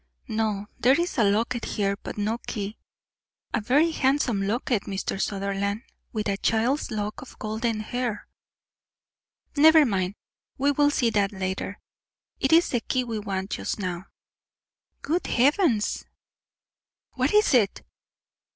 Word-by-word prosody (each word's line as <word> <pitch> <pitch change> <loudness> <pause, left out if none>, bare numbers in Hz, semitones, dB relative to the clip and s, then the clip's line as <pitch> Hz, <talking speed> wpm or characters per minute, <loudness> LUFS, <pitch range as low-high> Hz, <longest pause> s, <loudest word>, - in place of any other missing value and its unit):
"No; 215 -2 -1
there 265 +6 +4
is 345 -5 -1
a - - +5
locket 230 +4 +1
here, 200 -1 0
but 200 - -8
no 215 +3 -1
key. 210 0 -4 0.7
A - - +1
very 290 +10 +3
handsome 265 -7 +1
locket, 230 0 0
Mr. 195 0 -3
Sutherland, 200 +2 -2 0.3
with 215 -2 -2
a 200 -1 0
child's 235 +8 +1
lock 210 -1 -3
of 260 - -12
golden 220 +1 -2
hair 240 -1 -3 0.7
" - - -68
"Never 315 +1 +7
mind, 190 -4 -1 0.4
we 280 +2 +3
will 290 +1 +3
see 245 -5 +1
that 200 -2 +1
later; 190 +1 -3 0.6
it 270 - +1
is 335 +2 +5
the 245 - +1
key 255 +2 -1
we 230 -3 -3
want 195 -1 -4
just - - -2
now." 185 -2 -4 1.0
"Good 335 +5 -1
heavens!" 265 - +2 1.1
"What 260 +1 0
is 420 -6 +4
it?" 215 -6 +2
220 Hz, 140 wpm, -26 LUFS, 200-265 Hz, 1.1 s, Never